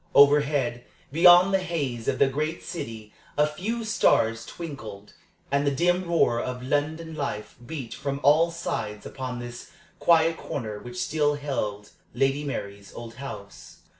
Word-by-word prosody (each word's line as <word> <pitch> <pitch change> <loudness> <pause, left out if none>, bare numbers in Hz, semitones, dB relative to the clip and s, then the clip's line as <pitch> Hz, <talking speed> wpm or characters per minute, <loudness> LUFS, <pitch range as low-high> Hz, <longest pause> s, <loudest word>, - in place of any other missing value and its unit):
Overhead, 140 -4 +4 0.3
beyond 175 +4 +7
the 195 - +4
haze 145 -11 -3
of - - +1
the - - +5
great 155 +5 -2
city, 110 -10 -7 0.2
a 150 - +5
few 215 +10 -3
stars 115 - +2
twinkled, 110 -11 -8 0.4
and 140 0 +2
the 145 - +3
dim 175 +6 +1
roar 120 -8 +3
of 125 0 -4
London 155 +4 -1
life 140 -8 -4
beat 130 -3 -6
from 140 -1 -3
all 155 +4 +5
sides 110 -10 -4
upon 130 -2 -5
this 120 0 -8 0.3
quiet 165 -1 +4
corner 110 -6 -5
which 120 +2 -9
still 150 -1 +1
held 105 -8 -3 0.2
Lady 135 +2 +1
Mary's 100 -8 -5
old 115 -1 -8
house. 100 -7 -9
140 Hz, 145 wpm, -26 LUFS, 120-160 Hz, 0.4 s, beyond